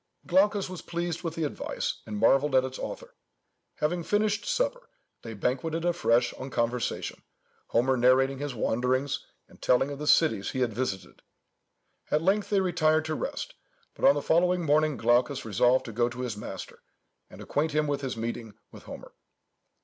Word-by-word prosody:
Glaucus 200 +2 +3
was 185 -2 -7
pleased 170 -1 -3
with 165 -2 -4
the 165 - -2
advice, 145 - -3
and 105 -1 -4
marvelled 135 +6 +3
at 130 - +5
its 130 0 -6
author. - - -7 0.6
Having 175 +3 -1
finished 210 +1 0
supper, - - -1 0.3
they 115 -1 -8
banqueted 155 - -1
afresh 125 -9 +2
on 130 - -7
conversation, 120 -1 -2 0.5
Homer 130 +3 +2
narrating 130 +2 +3
his 145 -3 -4
wanderings, 125 +5 0 0.2
and - - -20
telling 135 +3 +2
of 140 - -6
the 150 - -4
cities 115 -14 +3
he 130 - -3
had 120 -3 +1
visited. 95 -6 -4 0.9
At 155 +1 +1
length 200 +3 +2
they 200 -2 +3
retired 160 -4 +2
to 160 - -2
rest; 285 - -4 0.4
but - - -13
on 275 +1 +7
the - - -2
following 180 +2 +2
morning, 150 0 +2
Glaucus 120 +3 +2
resolved 120 +5 +3
to 115 - -6
go 120 +2 +1
to 125 +1 -7
his 125 -4 -3
master, 95 -3 -8 0.5
and - - -13
acquaint 155 +1 -1
him 155 0 +2
with 145 -1 -1
his 130 -3 -4
meeting 115 -2 -5 0.2
with - - -13
Homer. - - -10
140 Hz, 170 wpm, -28 LUFS, 125-170 Hz, 0.9 s, on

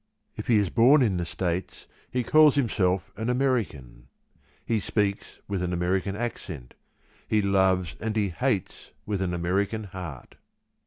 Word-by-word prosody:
If - - -7
he 115 - +5
is 100 -4 +1
born 130 +5 +6
in 100 -6 +1
the 85 -1 -2
States, 90 +1 -3 0.2
he 125 -1 -1
calls 155 +3 +6
himself 95 -8 +1
an 110 +3 -2
American 115 - -1 0.6
he 115 -2 +1
speaks 100 -1 -2
with 100 -2 -2
an 90 -1 -1
American 95 +3 0
accent; 90 - -5 0.5
he 110 - +2
loves 95 -3 +2
and 110 0 -3
he 105 -3 +1
hates 85 - -2 0.2
with 100 -2 -2
an 90 -2 0
American 95 +5 -1
heart. 90 -9 -9
100 Hz, 150 wpm, -26 LUFS, 90-110 Hz, 0.6 s, born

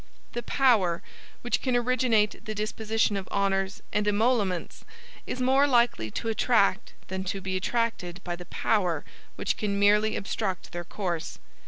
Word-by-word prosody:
The 240 - -3
POWER 220 -12 +2 0.4
which 240 - 0
can 255 -2 0
originate 240 -3 +1
the 215 - -4
disposition 215 0 0
of 195 -2 -4
honors 195 +1 0
and 210 0 +1
emoluments, 205 -4 +1 0.4
is 255 - -4
more 265 +3 +4
likely 240 - +2
to 225 - -4
attract 215 -3 +2 0.2
than 190 0 -3
to 195 +1 -2
be 190 0 -3
attracted 185 -3 -1
by 175 -1 -3
the 180 0 -10
POWER 180 -9 0 0.3
which - - -1
can 200 -2 -1
merely 210 +2 +4
obstruct 195 -2 -3
their 175 0 -4
course. 175 -3 -4
210 Hz, 150 wpm, -27 LUFS, 190-230 Hz, 0.4 s, more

